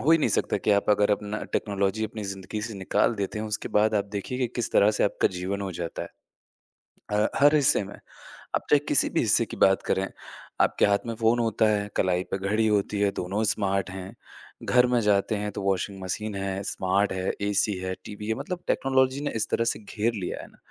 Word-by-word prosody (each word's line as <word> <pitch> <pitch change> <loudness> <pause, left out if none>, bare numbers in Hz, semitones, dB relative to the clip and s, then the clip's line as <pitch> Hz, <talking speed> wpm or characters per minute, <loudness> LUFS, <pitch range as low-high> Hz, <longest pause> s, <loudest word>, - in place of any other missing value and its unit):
हो 160 - +5
ही 165 - +7
नहीं 155 - +2
सकता - - +1
कि - - +3
आप 100 0 +3
अगर 105 0 +3
अपना 105 +1 -1
टेक्नोलॉजी 100 +1 0
अपनी 110 0 -6
ज़िंदगी 95 +2 -6
से 110 -1 -5
निकाल 100 +4 +1
देते 100 +1 -3
हो, 110 - -3
उसके 105 - -3
बाद 110 +1 +3
आप 100 -1 +2
देखिए 125 +6 -4
कि 125 - +1
किस 120 - -2
तरह 100 - +5
से - - +3
आपका 100 - +2
जीवन 95 +3 -3
हो 95 - -3
जाता 85 -1 -5
है। - - -7 1.0
अ, 105 0 +2
हर 145 +2 +6
हिस्से 150 -5 +4
में, 100 - -10 0.6
आप - - -2
चाहे, 145 - +6
किसी - - +3
भी - - 0
हिस्से - - +3
की - - -9
बात 95 0 +4
करें। 95 0 +1 0.5
आपके - - +3
हाथ 100 0 +4
में 115 - -3
फ़ोन 115 +1 +2
होता 115 -1 +2
है, 105 -1 0
कलाई 90 -1 +1
पे - - 0
घड़ी 105 +3 +1
होती 105 -1 +1
है, 100 -1 +2
दोनों 100 +4 -2
स्मार्ट 100 -2 -1
हैं। 95 0 -7 0.5
घर 125 0 +4
में 125 -1 +2
जाते 105 0 +2
हैं, 105 0 -3
तो 100 - -5
वॉशिंग 95 0 -1
मशीन 105 +3 -4
है, 95 0 -3
स्मार्ट 95 +1 0
है, 95 0 -1
एसी 100 +1 +1
है, 95 0 -3
टीवी 105 0 -7
है 110 - +1
मतलब 180 - -5
टेक्नोलॉजी 130 0 +2
ने 145 - -2
इस 110 - 0
तरह 115 - +1
से - - -11
घेर 110 +2 -2
लिया 95 -5 -4
है - - -11
ना। - - -22
105 Hz, 225 wpm, -26 LUFS, 95-110 Hz, 1.0 s, ही